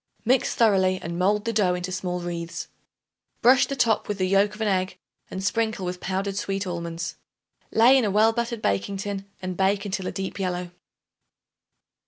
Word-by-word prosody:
Mix 250 +2 +2
thoroughly 190 -5 +3
and 170 +1 -5
mold 205 +3 +2
the 230 - -1
dough 190 -4 +2
into 180 +1 -4
small 180 -1 -3
wreaths; 170 -1 -5 0.7
brush 250 +2 +6
the 275 - -3
top 230 -5 +2
with 210 - -2
the 185 - +1
yolk 195 +2 +3
of 220 - -10
an 220 - +1
egg 185 -1 0 0.3
and 190 - -5
sprinkle 220 -2 0
with 180 0 -4
powdered 195 +2 -2
sweet 195 0 -2
almonds. 170 -1 -4 0.5
Lay 235 +4 +6
in - - 0
a 210 - +1
well 215 +3 +4
buttered 235 -1 -3
baking 100 - 0
tin 195 0 -5
and 185 0 -3
bake 195 +2 +1
until 190 -2 -3
a - - -2
deep 195 +1 -5
yellow. 180 -2 -2
195 Hz, 185 wpm, -25 LUFS, 180-210 Hz, 0.7 s, brush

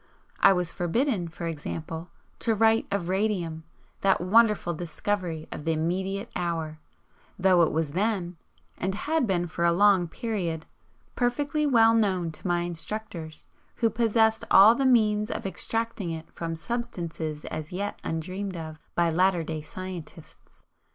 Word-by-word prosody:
I - - +7
was 180 -3 0
forbidden, 190 - 0
for 170 +1 -7
example, 165 +1 -5 0.3
to 225 -2 +1
write 225 +1 +3
of 200 -4 -1
radium, 180 -5 -1 0.3
that 195 -1 +3
wonderful 210 -1 +3
'discovery' 170 0 -3
of - - -6
the 165 +1 +1
immediate 190 +5 -2
hour, 165 -3 -2 0.6
though 185 -2 +4
it 165 - +3
was 160 -2 -1
then, 185 -1 -1 0.4
and 190 +2 -1
had 305 +3 0
been 175 -3 +1
for 170 0 -3
a 170 - +5
long 190 0 +4
period, 175 -6 -3 0.5
perfectly 290 +5 0
well 225 -4 +5
known 190 -7 +1
to 160 - -7
my 175 -1 +1
instructors, 175 -2 -6 0.3
who 230 -2 +1
possessed 225 -1 +2
all 200 +4 +8
the 265 +2 +1
means 215 -4 +3
of - - -4
extracting 225 0 -2
it 160 -1 -6
from 165 -1 -4
substances 170 -7 -4
as 155 0 -5
yet 200 +3 -3
undreamed 185 +4 -4
of 160 -1 -7 0.2
by 170 -1 +2
latter 180 0 +3
day 155 -1 -4
scientists. 175 -1 -10
180 Hz, 145 wpm, -27 LUFS, 165-215 Hz, 0.6 s, all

